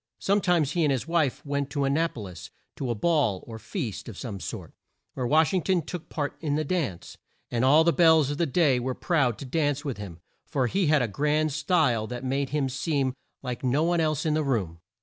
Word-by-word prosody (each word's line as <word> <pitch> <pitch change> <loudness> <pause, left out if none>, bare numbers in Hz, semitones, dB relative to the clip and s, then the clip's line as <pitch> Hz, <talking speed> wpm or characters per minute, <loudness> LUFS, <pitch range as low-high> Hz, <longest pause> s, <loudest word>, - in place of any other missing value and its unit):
Some 200 +1 +1
times 170 -7 +2
he 175 - 0
and 150 - +3
his 135 +2 -1
wife 160 -6 0
went 140 -1 -2
to 140 -1 -1
An 135 0 +1
na 165 +3 +2
po 120 - -9
lis, 90 -4 -9 0.3
to 130 - -4
a 120 - 0
ball 135 - +1
or 110 -1 -8
feast 115 - -5
of 105 - -9
some 105 -6 -5
sort, - - -7 0.4
where 125 -2 -2
Wash 155 +6 +3
ing 185 - +2
ton 180 -1 +1
took 175 +1 -7
part 145 -2 -3
in 150 -3 0
the 155 - 0
dance, 140 - -3 0.3
and 120 0 0
all 145 +5 +6
the 170 0 +3
belles 160 -4 +5
of 145 - -4
the 170 - +2
day 140 -3 +3
were 130 +1 -2
proud 135 - +1
to 140 - -7
dance 145 +1 0
with 135 -4 -3
him, 90 -5 -8 0.3
for 135 -5 0
he 185 +8 +1
had 150 -3 +4
a - - 0
grand 150 +7 +1
style 145 -7 +1
that 125 +2 -6
made 135 +1 -1
him 145 -1 0
seem 135 0 -1 0.3
like 125 -1 -5
no 135 +4 +2
one 170 +1 +2
else 155 -2 0
in 155 - +2
the 155 - +1
room. 100 - -1
145 Hz, 235 wpm, -26 LUFS, 125-160 Hz, 0.4 s, all